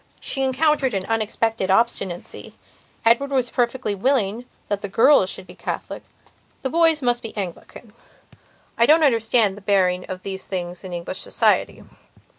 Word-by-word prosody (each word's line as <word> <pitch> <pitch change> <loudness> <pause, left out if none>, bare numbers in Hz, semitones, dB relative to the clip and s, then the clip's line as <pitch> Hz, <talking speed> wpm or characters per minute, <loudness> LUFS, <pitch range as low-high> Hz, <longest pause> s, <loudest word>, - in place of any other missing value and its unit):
She 270 - -5
encountered 270 -2 +1
an 190 -1 -2
unexpected 225 -2 -1
obstinacy. 195 -4 -1 0.5
Edward 240 +5 +4
was 260 -3 0
perfectly 245 -3 -1
willing 230 0 0 0.2
that 205 -1 -2
the 200 - -5
girls 225 -1 +4
should - - -6
be 180 - -13
Catholic; - - -6 0.6
the 265 - -2
boys 325 -3 +3
must 240 -1 +1
be 225 -1 -9
Anglican. 200 +3 -7 0.9
I 235 - +5
don't 315 +1 +5
understand 225 -5 +3
the 205 - -12
bearing 185 -2 +1
of 185 0 -6
these 190 -1 -5
things 180 -1 -5
in 185 - -8
English 175 +1 -4
society. - - +1
225 Hz, 150 wpm, -22 LUFS, 190-260 Hz, 0.9 s, I